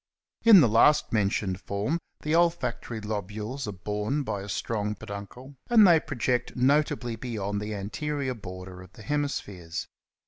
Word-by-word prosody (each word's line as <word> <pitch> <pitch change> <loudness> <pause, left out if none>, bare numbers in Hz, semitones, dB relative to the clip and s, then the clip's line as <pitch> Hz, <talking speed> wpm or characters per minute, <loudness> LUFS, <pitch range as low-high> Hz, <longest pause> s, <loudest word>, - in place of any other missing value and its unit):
In 220 -6 +9
the 130 - +5
last 115 +7 +4
mentioned 100 -3 0
form 105 +12 -2 0.2
the 150 - -1
olfactory 165 -9 0
lobules 105 +5 -4
are - - -2
borne 105 +9 -2
by 100 -6 -3
a 100 - -8
strong 105 0 -2
peduncle 100 +8 -9 0.2
and 225 -3 +7
they 170 -3 +7
project 125 -3 -2
notably 130 -2 +1
beyond 105 -4 -3
the 105 +1 -4
an 100 0 -5
terior 145 -3 -2
border 90 -1 -8
of 95 - -14
the 110 - -13
hemispheres. 100 - -3
110 Hz, 150 wpm, -27 LUFS, 100-145 Hz, 0.2 s, In